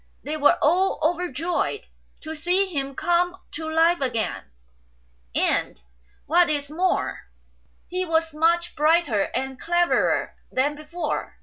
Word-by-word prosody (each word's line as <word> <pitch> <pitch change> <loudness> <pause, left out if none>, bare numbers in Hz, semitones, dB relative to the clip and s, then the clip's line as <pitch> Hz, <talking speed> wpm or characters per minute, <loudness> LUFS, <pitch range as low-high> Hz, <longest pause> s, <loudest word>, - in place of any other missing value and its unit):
They 300 - -3
were 290 -1 +4
all 360 +6 +3
overjoyed 350 +4 -1 0.4
to 315 0 -6
see 355 +5 +1
him 275 -7 -4
come 350 +3 +1
to 315 +1 -5
life 325 +1 +3
again; 240 -4 -2 0.9
and, - - 0 0.5
what 345 +2 +4
is 290 -1 -2
more, 360 +4 -1 0.6
he 365 +1 -2
was 325 -2 0
much 340 +3 +1
brighter 300 - +2
and 265 0 -3
cleverer 345 +1 +1 0.2
than 280 +3 +1
before. 305 +4 -5
325 Hz, 120 wpm, -24 LUFS, 295-350 Hz, 0.9 s, were